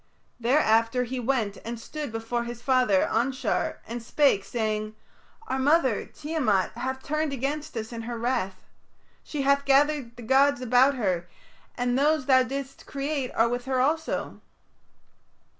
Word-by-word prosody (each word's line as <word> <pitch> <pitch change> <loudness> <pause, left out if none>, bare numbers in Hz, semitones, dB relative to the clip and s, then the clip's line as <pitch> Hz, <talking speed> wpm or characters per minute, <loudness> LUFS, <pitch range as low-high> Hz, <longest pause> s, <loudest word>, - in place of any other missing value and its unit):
Thereafter 230 -1 +3
he 250 +1 -4
went 230 -5 -1
and 235 0 -5
stood 295 +2 -6
before 225 +2 -2
his 240 0 -6
father, 250 -6 +3
Anshar, 255 +4 0
and 235 +1 -5
spake, 240 -4 +2
saying, 215 -1 -2 0.5
"Our 265 - -1
mother, 270 -4 +2
Tiamat, 295 - 0
hath 260 +3 -4
turned 305 +1 -1
against 285 +2 -3
us 225 +1 -5
in 230 - -5
her 240 - -3
wrath. 230 -5 -2 0.6
She 290 -3 -3
hath 280 +1 +3
gathered 280 -3 +2
the 240 - -10
gods 270 +3 +4
about 255 +3 +4
her, 180 -7 -1 0.5
and 245 +1 +1
those 300 -1 +2
thou 260 -1 +5
didst 270 +2 -5
create 280 -2 -3
are 225 - +4
with 245 +1 -3
her 260 -1 0
also." 315 +5 -1
255 Hz, 145 wpm, -26 LUFS, 230-280 Hz, 0.6 s, thou